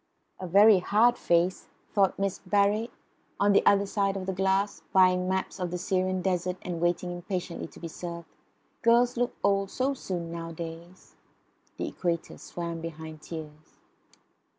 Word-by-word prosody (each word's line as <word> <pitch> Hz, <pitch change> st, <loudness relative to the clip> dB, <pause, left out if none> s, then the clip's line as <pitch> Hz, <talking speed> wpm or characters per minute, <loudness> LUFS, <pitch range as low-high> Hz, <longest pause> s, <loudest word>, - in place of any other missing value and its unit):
"A 185 Hz, -, -5 dB
very 200 Hz, +3 st, +7 dB
hard 220 Hz, +6 st, +4 dB
face," 175 Hz, -1 st, +1 dB, 0.3 s
thought 195 Hz, -2 st, +3 dB
Miss 195 Hz, -1 st, -1 dB
Barrett, 205 Hz, +3 st, +1 dB, 0.5 s
on 205 Hz, 0 st, +4 dB
the -, -, +5 dB
other 200 Hz, 0 st, +5 dB
side 195 Hz, -1 st, 0 dB
of 185 Hz, -, -5 dB
the 190 Hz, -, -2 dB
glass, 195 Hz, +2 st, 0 dB
buying 185 Hz, -1 st, +4 dB
maps 190 Hz, 0 st, -2 dB
of 180 Hz, -1 st, -2 dB
the 180 Hz, -, -3 dB
Syrian 185 Hz, 0 st, 0 dB
desert 180 Hz, -1 st, 0 dB
and 175 Hz, -2 st, -4 dB
waiting 175 Hz, +1 st, 0 dB
impatiently 175 Hz, 0 st, -4 dB
to -, -, -15 dB
be 170 Hz, -, -5 dB
served. 170 Hz, 0 st, -7 dB, 0.6 s
"Girls 240 Hz, +1 st, +4 dB
look 245 Hz, 0 st, -1 dB
old 195 Hz, -1 st, +2 dB
so 260 Hz, +5 st, 0 dB
soon 175 Hz, -9 st, -5 dB
nowadays." 165 Hz, +1 st, -8 dB, 0.6 s
The -, -, -2 dB
equator 170 Hz, -2 st, -3 dB
swam 170 Hz, -1 st, -5 dB
behind 160 Hz, -1 st, -8 dB
tears. 155 Hz, -1 st, -9 dB
185 Hz, 150 wpm, -28 LUFS, 170-200 Hz, 0.6 s, very